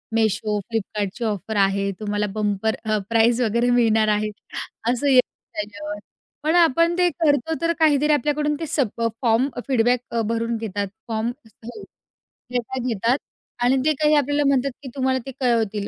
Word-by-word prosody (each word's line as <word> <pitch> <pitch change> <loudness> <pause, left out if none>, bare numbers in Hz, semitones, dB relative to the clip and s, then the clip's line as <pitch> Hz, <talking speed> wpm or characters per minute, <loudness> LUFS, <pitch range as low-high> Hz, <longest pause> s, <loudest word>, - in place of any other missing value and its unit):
Meesho, 215 -1 +1
Flipkartची 210 +1 -3
offer 215 0 -3
आहे. 195 0 -1
तुम्हाला 210 0 -1
bumper 210 +1 0
अ, 215 0 +1
price 230 +2 +3
वगैरे 235 +2 +2
मिळणार 225 -3 +3
आहे 215 0 -1 0.6
असं 255 +3 -1
येतं 255 -2 +5 0.3
त्याच्यावर. 205 0 -5 0.4
पण 315 +2 +2
आपण 335 +1 +4
ते 360 -1 +4
करतो, 305 -2 +1
तर 335 0 +2
काहीतरी 300 -1 +4
आपल्याकडून 295 +1 +1
ते 325 - -3
सप 240 -6 -1
अ, 230 - +3
फॉर्म 240 +3 +2
अ, - - -4
फीडबॅक 245 -1 +3
अ, 230 -1 0
भरून 230 0 -1
घेतात. 205 -2 -3 0.2
फॉर्म 225 +1 -1 0.3
हो, 240 - -8 0.7
डेटा 250 +1 -2
घेतात 230 +3 +1 0.5
आणि 260 +2 +4
ते 310 - +4
काही 300 0 +4
आपल्याला 290 +1 +2
म्हणतात 275 0 +2
की 265 - -7
तुम्हाला 260 -1 +1
ते 270 - -6
कळवतील. 220 -5 0
235 Hz, 165 wpm, -22 LUFS, 215-280 Hz, 0.7 s, येतं